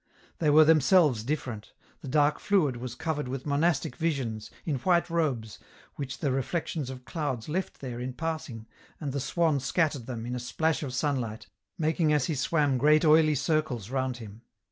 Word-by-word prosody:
They 155 - +2
were 155 +1 +7
themselves 155 - +4
different; 120 -5 -4 0.3
the - - -8
dark 145 +2 +2
fluid 155 -11 +2
was 125 0 -6
covered 155 -2 -2
with 130 0 -5
monastic 145 -2 +1
visions, 130 -10 -2 0.2
in 150 -5 0
white 175 +4 +1
robes, 135 -11 -1 0.4
which 135 -1 -5
the 140 - -1
reflections 135 +1 -2
of 130 -1 -9
clouds 145 -8 -3
left 180 +5 -3
there 125 -3 -5
in 125 +1 -4
passing, 150 -7 -4 0.3
and 145 -4 -4
the 140 - -1
swan 155 +2 +1
scattered 140 -2 0
them, 120 -3 -5
in 120 - -4
a 125 - -2
splash 160 +6 0
of 130 -4 -4
sunlight, 130 -6 -2 0.3
making 160 0 +1
as 145 -4 +2
he 160 - -1
swam 145 -1 +1
great 150 +3 +4
oily 155 0 +5
circles 135 - -1
round 130 -2 -1
him. 110 -1 -11
140 Hz, 175 wpm, -28 LUFS, 125-155 Hz, 0.4 s, were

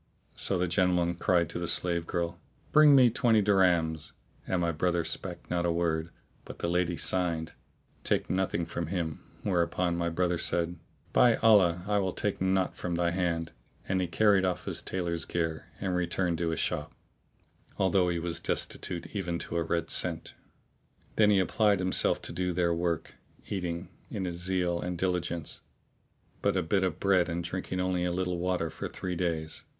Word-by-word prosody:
So 95 - -1
the 90 +1 +1
gentleman 90 -1 +2
cried 90 0 +2
out 85 - -7
to 85 - -4
the 85 - -2
slave 85 0 +3
girl, 85 0 -2 0.3
"Bring 150 -2 +7
me 125 -3 +6
twenty 115 -2 +3
dirhams," 90 -6 +2 0.3
and 95 - 0
my 85 -1 +1
brother 85 +1 0
spake 85 +2 -4
not 85 -1 +1
a 85 - +1
word; 85 -1 0 0.3
but - - -10
the - - -2
lady 90 -1 +1
signed, 85 -3 0 0.5
"Take - - 0
nothing 95 -2 0
from 85 -1 -4
him;' 85 -4 -3 0.2
whereupon 90 -1 +1
my 85 0 0
brother 85 0 0
said, 85 0 0 0.3
"By 120 -2 +6
Allah 90 -6 +4
I 105 0 +2
will 95 -2 -1
take 105 -3 -2
naught 95 0 +1
from 90 -1 -3
thy 85 0 +1
hand. 85 -2 -1 0.4
And 95 -1 +1
he 90 - 0
carried 100 +2 +3
off 90 -1 -1
his - - -2
tailor's 85 -3 -2
gear 80 -2 -2
and 95 -2 -2
returned 90 -1 0
to 85 -1 0
his 80 - -2
shop, 75 - -2 0.8
although 95 -1 +3
he 85 - 0
was 85 0 -3
destitute 85 +4 -4
even 90 -4 -2
to 85 - -4
a - - +1
red 85 0 -1
cent.[FN#638] 85 -2 -7
Then 105 -1 +5
he 100 -2 +5
applied 105 +2 +3
himself 95 0 +1
to - - -3
do 90 -1 -1
their 85 -1 +1
work; 85 -1 -2 0.3
eating, 85 -3 -3 0.2
in 95 - -3
his 85 -1 -4
zeal 90 -1 0
and 90 0 -3
diligence, 85 -3 -2 0.8
but - - +1
a - - +1
bit 95 +4 +1
of 90 -2 -1
bread 95 -3 +3
and 85 +1 -2
drinking 95 +1 -4
only 90 -1 0
a 90 - 0
little 90 -1 -1
water 90 -2 -1
for - - -5
three 90 -1 -5
days. 80 -3 -2
90 Hz, 180 wpm, -29 LUFS, 85-95 Hz, 0.8 s, Bring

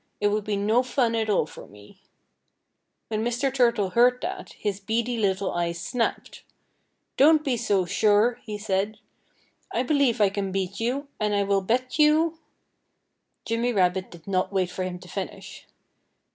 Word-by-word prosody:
It 205 - +2
would 210 0 -1
be 210 -2 -1
no 215 +5 +2
fun 250 -2 0
at 220 -1 -1
all 200 - +2
for - - -12
me." 105 0 -17 1.1
When 215 0 -1
Mr. 245 +3 -1
Turtle 235 -7 +2
heard 245 +4 +4
that, 370 +2 -5
his 205 -2 -3
beady 230 +4 -1
little 200 -3 0
eyes 170 -1 -2
snapped. 235 +7 -3 0.8
"Don't 305 +2 +6
be 265 -3 +1
so 205 -5 +1
sure!" 215 +6 +2
he 210 -2 -6
said. 205 0 -1 0.7
"I 240 - 0
believe 265 -4 +2
I 205 -2 +5
can 195 -1 -3
beat 195 0 -3
you. 255 +5 -2
And 210 -1 0
I 200 - +2
will 200 0 +1
bet 250 +8 -1
you 315 +2 +4 0.5
" - - -52
Jimmy 235 +2 0
Rabbit 185 -1 +1
did 170 -2 -14
not 185 -1 0
wait 185 -2 0
for 185 - -3
him 180 -1 -4
to 180 0 -14
finish. 190 +1 -7
215 Hz, 170 wpm, -25 LUFS, 195-245 Hz, 1.1 s, Don't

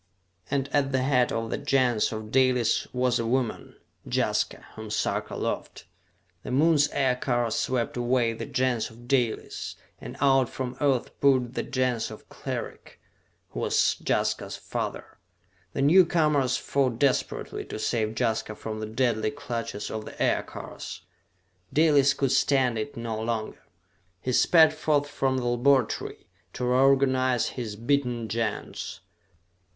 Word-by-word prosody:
And 135 -1 0
at 140 -1 +1
the 130 -1 +1
head 125 -2 +2
of 115 0 -2
the - - -2
Gens 125 -5 +2
of 110 -1 -6
Dalis 130 -3 +2
was 125 -1 +1
a 115 - -1
woman, 125 -1 -2 0.3
Jaska, - - 0
whom 110 -1 -8
Sarka 105 - -2
loved. - - -4 0.6
The - - -8
Moon's 145 +2 +4
aircars 125 -3 0
swept 125 -2 -1
away 120 -1 +1
the 115 - -6
Gens 125 -3 0
of 120 +2 -15
Dalis, 125 -4 -1 0.2
and - - -9
out 135 -3 +4
from 125 -1 -5
Earth 135 -4 +1
poured 130 -3 +3
the - - -1
Gens 125 -3 -1
of - - -11
Cleric, - - -6 0.5
who - - -6
was - - +2
Jaska's - - -1
father. - - -5 0.5
The 135 - -1
newcomers 150 -5 +4
fought 130 -4 0
desperately 135 0 0
to - - -6
save 110 0 -1
Jaska 110 -3 -1
from 110 0 -6
the 110 - -4
deadly 110 -1 0
clutches 120 -6 -5
of 110 -1 -5
the - - -11
aircars. - - -3 0.7
Dalis 145 -3 +4
could 135 -2 0
stand 130 -3 +2
it 110 +5 -5
no 115 -2 -3
longer. 110 -1 -3 0.6
He 125 - -3
sped 160 +3 +6
forth 150 -2 +1
from 135 -2 0
the 125 - -2
laboratory, 120 0 +1 0.3
to 125 - -3
reorganize 130 -1 +3
his 115 -5 -5
beaten 120 0 0
Gens. 115 -4 -3
125 Hz, 140 wpm, -26 LUFS, 115-135 Hz, 0.7 s, sped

